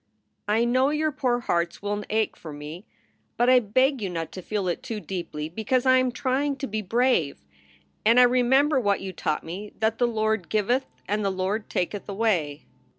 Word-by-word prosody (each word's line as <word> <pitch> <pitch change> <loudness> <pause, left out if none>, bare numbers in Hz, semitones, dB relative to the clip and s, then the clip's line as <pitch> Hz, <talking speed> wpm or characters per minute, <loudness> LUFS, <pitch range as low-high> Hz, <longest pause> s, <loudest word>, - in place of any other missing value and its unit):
I 220 +3 +2
know 255 +3 +3
your 305 +1 0
poor 250 -4 0
hearts 170 -5 -1
will 205 0 -2
ache 220 0 0
for 160 - -10
me, 150 +6 -9 0.5
but 245 +2 +4
I 255 - +7
beg 255 +4 +1
you 195 - -2
not 165 -2 -4
to 185 - -7
feel 200 0 -2
it 175 - -2
too 220 -2 -5
deeply, 170 -6 -5
because 220 +9 -1
I 260 0 +6
am 255 -1 +1
trying 270 +3 0
to 275 - -4
be 215 -3 -3
brave. 205 - +1 0.6
And 230 +3 +5
I - - +9
remember 260 +4 +4
what 205 -4 +1
you 190 -1 -5
taught 155 -3 -2
me, 195 +6 -7
that 220 0 0
the 245 - +3
Lord 220 -5 -1
giveth 240 +5 +1 0.2
and 210 +1 0
the 200 - +1
Lord 190 +3 -2
taketh 195 +3 -3
away. 185 -9 0
215 Hz, 195 wpm, -25 LUFS, 185-250 Hz, 0.6 s, I